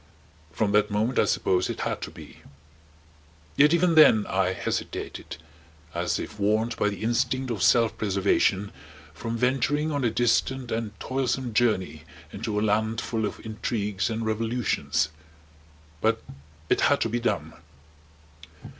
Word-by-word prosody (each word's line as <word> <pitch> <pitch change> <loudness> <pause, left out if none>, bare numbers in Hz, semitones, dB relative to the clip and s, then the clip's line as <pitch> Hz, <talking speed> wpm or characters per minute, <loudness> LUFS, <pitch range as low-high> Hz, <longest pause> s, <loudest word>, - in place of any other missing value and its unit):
From 100 +5 0
that 105 +1 +3
moment, 110 +5 0
I - - +4
suppose, 90 0 +1
it - - -4
had - - -2
to - - -5
be. - - -13 1.2
Yet 150 +1 +5
even 170 0 +3
then 150 -9 +7
I 95 -1 +1
hesitated, 95 - -4 0.6
as - - -1
if - - -7
warned 110 +3 +1
by 105 - +1
the 100 0 -6
instinct 125 +2 0
of 105 -5 -3
self 115 +3 +4
preservation 100 0 +1 0.4
from 115 +9 -4
venturing 135 +5 +1
on 145 -2 -1
a 120 - +3
distant 120 +2 0
and 110 -2 -3
toilsome 130 -2 -2
journey 100 -8 +1 0.3
into 105 0 -3
a 105 - +1
land 110 +2 +1
full 110 -2 -2
of - - -9
intrigues 105 -3 -2
and 115 0 -3
revolutions. 110 -7 0 0.9
But 110 0 +2 0.5
it - - +2
had - - +4
to 115 - +1
be 120 +2 -1
done. 120 - -2
110 Hz, 145 wpm, -26 LUFS, 105-120 Hz, 1.2 s, then